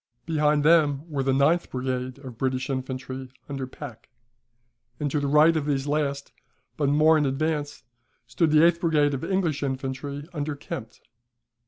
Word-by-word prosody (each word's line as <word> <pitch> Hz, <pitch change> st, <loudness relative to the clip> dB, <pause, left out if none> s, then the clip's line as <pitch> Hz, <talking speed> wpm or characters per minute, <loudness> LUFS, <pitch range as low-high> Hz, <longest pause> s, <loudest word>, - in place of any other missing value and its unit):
Behind 150 Hz, -2 st, +2 dB
them 155 Hz, -2 st, +4 dB
were 140 Hz, -2 st, -1 dB
the 135 Hz, 0 st, +1 dB
ninth 140 Hz, +6 st, +2 dB
brigade 130 Hz, 0 st, -3 dB
of 125 Hz, -3 st, -8 dB
British 130 Hz, 0 st, -1 dB
infantry 130 Hz, 0 st, -5 dB, 0.2 s
under 135 Hz, -2 st, -4 dB
Pack; 125 Hz, -4 st, -10 dB, 0.9 s
and 145 Hz, -2 st, -1 dB
to 150 Hz, -, +1 dB
the 145 Hz, -, -1 dB
right 150 Hz, +3 st, +5 dB
of 150 Hz, -2 st, -1 dB
these 140 Hz, -2 st, 0 dB
last, 145 Hz, -1 st, -1 dB, 0.4 s
but 145 Hz, -2 st, +1 dB
more 155 Hz, +2 st, +5 dB
in 150 Hz, -, +1 dB
advance, 145 Hz, +1 st, -2 dB, 0.4 s
stood 130 Hz, +8 st, +1 dB
the 155 Hz, +2 st, +6 dB
eighth 170 Hz, 0 st, +3 dB
brigade 150 Hz, -4 st, +2 dB
of 135 Hz, -, -3 dB
English 180 Hz, -6 st, 0 dB
infantry 135 Hz, +1 st, -4 dB
under 150 Hz, -1 st, -3 dB
Kempt. 115 Hz, -5 st, -8 dB
145 Hz, 160 wpm, -25 LUFS, 130-155 Hz, 0.9 s, the